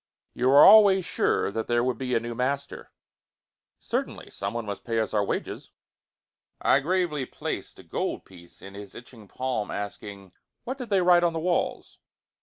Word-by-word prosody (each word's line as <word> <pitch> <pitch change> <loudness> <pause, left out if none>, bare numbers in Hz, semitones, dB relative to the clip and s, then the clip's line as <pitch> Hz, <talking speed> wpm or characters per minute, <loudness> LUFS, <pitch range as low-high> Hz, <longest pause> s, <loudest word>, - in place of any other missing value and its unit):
"You 125 +1 0
were 140 +2 +8
always 200 -4 +7
sure - - 0
that 110 +2 -4
there 120 0 +1
would 125 -2 -2
be 125 -2 -2
a - - +3
new 120 +1 -6
master?" 140 +4 -4 0.9
"Certainly. - - -4
Someone 105 +4 -4
must 100 -1 -6
pay 115 -1 -1
us 110 - -2
our 105 -1 +2
wages." - - -4 0.9
I - - +3
gravely 155 -3 -1
placed - - -6
a - - -13
gold - - -4
piece 85 -2 -17
in 95 - -10
his 100 -1 -11
itching 115 -3 -13
palm, 125 -2 -3
asking, 100 -1 -7 0.3
"What 260 +3 -6
did 250 -3 -7
they 195 -2 +2
write 175 -1 +5
on 170 -1 +2
the 165 - -3
walls?" 175 +2 -2
125 Hz, 175 wpm, -26 LUFS, 105-170 Hz, 0.9 s, were